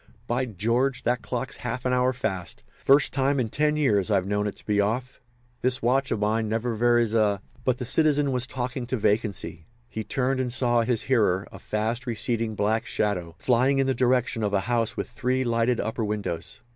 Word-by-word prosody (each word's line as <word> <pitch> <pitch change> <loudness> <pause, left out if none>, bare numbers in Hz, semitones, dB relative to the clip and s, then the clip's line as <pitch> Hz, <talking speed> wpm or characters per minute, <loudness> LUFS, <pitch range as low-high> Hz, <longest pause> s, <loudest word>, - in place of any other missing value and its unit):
"By 120 +2 0
George! 120 +5 0
that 120 0 +1
clock's 125 +1 -4
half 125 +1 -4
an 125 - +2
hour 125 0 +3
fast! 95 -8 -4 0.2
First 140 +1 +4
time 140 0 +1
in 115 -3 0
ten 150 +5 +1
years 110 -10 +2
I've 95 -3 +2
known 105 +1 0
it 100 - -4
to - - -15
be 105 -1 +2
off. 120 +6 -2 0.4
This 125 -1 +1
watch 135 +3 +2
of 115 - 0
mine 110 +1 0
never 115 +2 -1
varies 120 0 +2
a—" 105 -3 +2 0.2
But 125 -1 +1
the 125 - -4
citizen 145 +1 +2
was 125 0 0
talking 125 -1 -4
to 130 - -1
vacancy. 105 -6 -1 0.2
He 110 - -4
turned 130 +4 0
and 125 -2 -1
saw 120 -1 +2
his 115 -1 0
hearer, 105 -7 +2
a - - -10
fast 115 +3 -2
receding 115 -1 -1
black 105 +2 0
shadow, 90 -6 -1
flying 130 +5 +2
in 135 - +3
the 135 - +1
direction 125 -2 +1
of 105 -1 0
a 95 - +2
house 115 +1 -1
with - - -2
three 125 +2 -1
lighted 120 0 +1
upper 110 +1 -2
windows. 100 -5 -4
120 Hz, 200 wpm, -26 LUFS, 105-130 Hz, 0.4 s, First